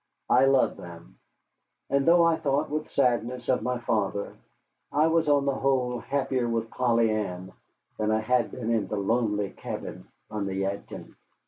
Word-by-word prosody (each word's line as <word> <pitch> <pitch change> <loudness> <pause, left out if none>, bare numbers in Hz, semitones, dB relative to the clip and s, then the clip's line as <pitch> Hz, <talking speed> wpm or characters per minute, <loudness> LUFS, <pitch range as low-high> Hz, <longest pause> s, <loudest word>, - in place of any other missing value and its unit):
I 130 +2 +6
loved 135 -1 +3
them; 85 -1 -12 0.7
and 140 +1 +1
though 170 0 +6
I 165 -1 +4
thought 145 -2 -1
with 155 0 -3
sadness 125 -1 0
of 130 - +2
my 125 0 -1
father, 105 -4 -1 0.6
I 150 +2 +3
was 160 -1 +2
on 140 -1 +3
the 140 - +1
whole 130 -2 0
happier 130 -2 -1
with 115 -1 -2
Polly 115 -3 +2
Ann 95 -4 -4 0.5
than 110 0 0
I 110 0 +2
had 125 +4 +1
been 115 -2 -4
in 110 -4 +1
the 105 - -3
lonely 105 -1 0
cabin - - -7 0.2
on 105 -2 -3
the 95 - -3
Yadkin. 95 +1 -4
120 Hz, 165 wpm, -27 LUFS, 105-135 Hz, 0.7 s, I